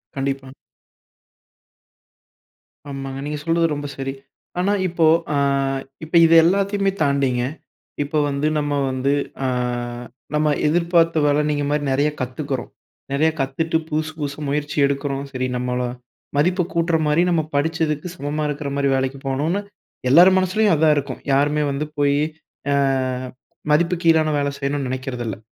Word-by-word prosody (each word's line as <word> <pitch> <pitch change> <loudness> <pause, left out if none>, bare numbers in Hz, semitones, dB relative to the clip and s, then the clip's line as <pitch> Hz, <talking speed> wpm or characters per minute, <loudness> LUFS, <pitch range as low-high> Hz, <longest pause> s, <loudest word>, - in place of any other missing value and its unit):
கண்டிப்பா. 135 -1 -3 2.4
ஆமாங்க. 135 -1 -5
நீங்க 150 0 -3
சொல்றது 165 0 +2
ரொம்ப 145 0 -4
சரி. 135 0 -3 0.5
ஆனா 200 +3 +2
இப்போ 170 -2 +1 0.3
அ - - +1 0.7
இப்போ 160 +2 -4
இது 165 0 +5
எல்லாத்தையுமே 195 +2 +2
தாண்டிங்க, 140 -4 +2 0.6
இப்போ 150 +2 -3
வந்து 140 +2 0
நம்ம 145 -1 -1 0.2
வந்து 130 +2 0 0.3
அ - - +2 0.9
நம்ம 150 0 +2 0.2
எதிர்பார்த்த 165 -1 +3
வேலை 145 +1 +3
நீங்க 145 -1 0
மாரி 150 0 0
நெறையா 145 +3 +2
கத்துக்கிறோம். 130 0 -4 0.4
நெறையா 155 +3 +2
கத்துட்டு, 160 +5 0
புதுசு 155 +1 -1
புதுசு 145 -1 -4
முயற்சி 145 +1 -2
எடுக்கிறோம். 140 0 -2
சரி 130 -1 -2
நம்மள 125 0 -1 0.6
மதிப்பு 180 +5 +2
கூட்டுற 170 0 +2
மாதிரி, 150 +3 +3
நம்ம 170 -2 +2
படிச்சதுக்கு 155 +1 0
சமமா 150 -2 -3
இருக்கற 145 -1 -3
மாரி 140 0 +1
வேலைக்கு 135 +1 -1
போகணும்னு, 150 +8 0 0.5
எல்லார் 175 +8 +8
மனசுலயும் 190 +1 +2
அதான் 155 0 +4
இருக்கும். 140 -2 -4
யாருமே 145 +2 +2
வந்து 140 +2 -2
போய் 140 0 +3 0.5
அ - - +3 1.0
மதிப்பு 170 +4 +3
கீழான 160 -2 +4
வேலை 140 0 0
செய்யணும்னு 140 -1 -1
நினைக்கிறதில்லை. 125 -4 -4
145 Hz, 130 wpm, -21 LUFS, 140-160 Hz, 2.4 s, எல்லார்